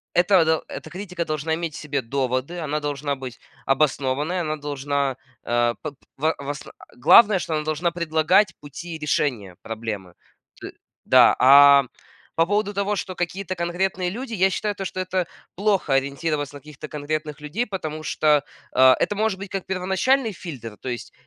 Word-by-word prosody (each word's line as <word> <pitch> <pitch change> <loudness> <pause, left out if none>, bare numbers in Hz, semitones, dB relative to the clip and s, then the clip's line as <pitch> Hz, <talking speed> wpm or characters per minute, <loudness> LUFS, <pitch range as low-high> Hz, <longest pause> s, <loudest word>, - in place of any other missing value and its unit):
этого 175 -1 +5
до 160 0 +1
Эта - - -8
критика 180 -2 -5
должна 155 +1 -1
иметь 165 -2 -4
в - - -6
себе 145 -3 -2
доводы, 130 +6 -2
она 150 -1 -2
должна 145 -1 -2
быть 130 -2 -8 0.3
обоснованной, 145 +4 +1
она 155 -2 -2
должна, 140 -2 -2 0.3
э, 120 0 +1
пок 150 -3 -6 0.2
в 155 +3 +1
в 140 - -9
ос 145 0 -5 0.3
Главное, 205 - +6
что 160 - -3
она 150 - -1
должна 155 +3 0
предлагать 170 +4 +2
пути 160 +4 -8
решения 120 -11 -1
проблемы. 110 -5 -5 0.5
Т - - -8 0.3
да, - - +6
а 140 +1 +8 0.5
по 165 - +3
поводу 205 +1 0
того, 200 +1 0
что 185 -2 -4
какие-то 185 +2 -3
конкретные 180 +1 -1
люди, 240 +3 -6
я 190 -2 +3
считаю, 210 +1 -2
то 195 0 -5
что 185 - -5
это 185 -1 -1 0.3
плохо- 195 -7 +1
ориентироваться 145 +1 -1
на 145 - -8
каких-то 150 +1 -10
конкретных 150 0 -4
людей, 185 +12 -2
потому 155 -6 -5
что, 150 -1 +2 0.3
э, 130 0 +7
это 205 - 0
может 215 -2 0
быть 195 0 -7
как 195 -2 -4
первоначальный 190 +7 +1
фильтр, 125 - -8
то 130 - -5
есть, 120 -1 -6
155 Hz, 170 wpm, -23 LUFS, 140-185 Hz, 0.5 s, а